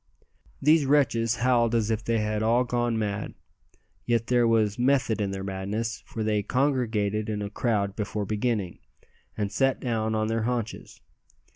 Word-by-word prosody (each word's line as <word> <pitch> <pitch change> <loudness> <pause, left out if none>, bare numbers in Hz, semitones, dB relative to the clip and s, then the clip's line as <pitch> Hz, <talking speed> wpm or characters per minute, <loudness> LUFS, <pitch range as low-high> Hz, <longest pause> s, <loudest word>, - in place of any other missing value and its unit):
These 150 0 +4
wretches 115 -5 +2
howled 120 -1 +2
as 115 -1 +1
if 110 0 -1
they 115 0 0
had 105 0 -1
all 115 +3 +3
gone 120 -2 -1
mad. 105 -2 -3 0.7
Yet 115 +1 +1
there 120 -1 +3
was 110 -1 +2
"method 125 -4 +2
in 100 - 0
their 95 0 -4
madness;" 100 +4 -3
for 110 - -4
they 105 -1 +1
congregated 110 -5 0
in 105 -1 -2
a 100 - -5
crowd 105 -3 0
before 105 0 -3
beginning, 105 -3 -2 0.6
and 100 -2 -2
sat 135 +2 +1
down 110 -3 -1
on 110 0 +1
their 115 +1 -1
haunches. 120 -1 -4
110 Hz, 160 wpm, -26 LUFS, 105-120 Hz, 0.7 s, These